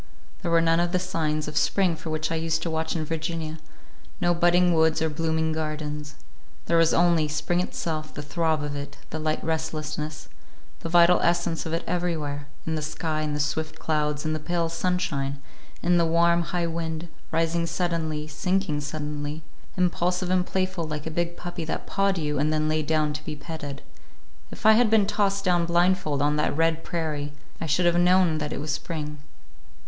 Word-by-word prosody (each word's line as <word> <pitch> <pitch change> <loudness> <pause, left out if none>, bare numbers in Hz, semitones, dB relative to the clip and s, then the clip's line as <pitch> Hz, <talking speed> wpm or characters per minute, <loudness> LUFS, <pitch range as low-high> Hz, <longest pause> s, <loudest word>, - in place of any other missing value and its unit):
There 175 - -2
were 165 0 +5
none 165 0 +3
of 175 0 0
the - - +4
signs 155 -4 -1
of 150 - -6
spring 185 +1 +2
for 160 +1 -7
which 155 0 -1
I - - 0
used 160 0 0
to 165 - -2
watch 160 +1 -1
in 160 -2 -1
Virginia, 160 0 -3 0.6
no 175 -2 +3
budding 175 +1 +4
woods 160 -1 +3
or 160 - +1
blooming 160 0 0
gardens. 150 -1 -4 0.5
There 170 0 +3
was 165 0 +5
only—spring 165 -1 +2
itself; 155 -3 -3
the 150 - -7
throb 155 0 0
of 145 0 -3
it, 140 0 -6
the 160 - -3
light 155 0 -1
restlessness, 155 -1 -3 0.5
the 165 - -5
vital 175 +1 +6
essence 170 -1 +1
of 160 - -3
it 165 - -1
everywhere; 155 -5 -2 0.2
in 160 - -1
the 155 - -1
sky, 155 +1 -2
in 150 -1 -1
the - - -2
swift 155 +2 -1
clouds, 150 -1 -1
in 155 - 0
the 155 - -2
pale 170 +1 -1
sunshine, 165 -5 -1 0.4
and 175 - +2
in 175 - +5
the 170 - +4
warm, 170 +1 +4
high 175 -1 0
wind—rising 165 0 -2
suddenly, 160 -3 -1
sinking 180 0 0
suddenly, 150 +1 -4 0.3
impulsive 180 0 +1
and 180 -1 +2
playful 185 -3 -1
like 150 -1 -4
a 160 - -3
big 170 +1 -1
puppy 175 -1 -5
that - - -3
pawed 195 -1 +1
you 150 -3 -1
and 150 +2 +2
then 155 0 +1
lay 155 0 +1
down 155 0 +1
to 150 +1 -6
be 155 - -5
petted. 145 -2 -7 0.7
If - - -11
I 220 - +9
had 225 +1 +5
been 215 -2 +5
tossed 200 -1 0
down 175 -2 +3
blindfold 170 -4 +2
on 150 +1 +2
that 150 -1 0
red 165 0 +2
prairie, 150 -4 -3 0.3
I 165 - -2
should 160 +5 +2
have 175 0 +4
known 180 -3 +4
that 150 -1 -3
it - - -3
was 150 +1 -3
spring. 150 0 -4
160 Hz, 190 wpm, -26 LUFS, 155-175 Hz, 0.7 s, I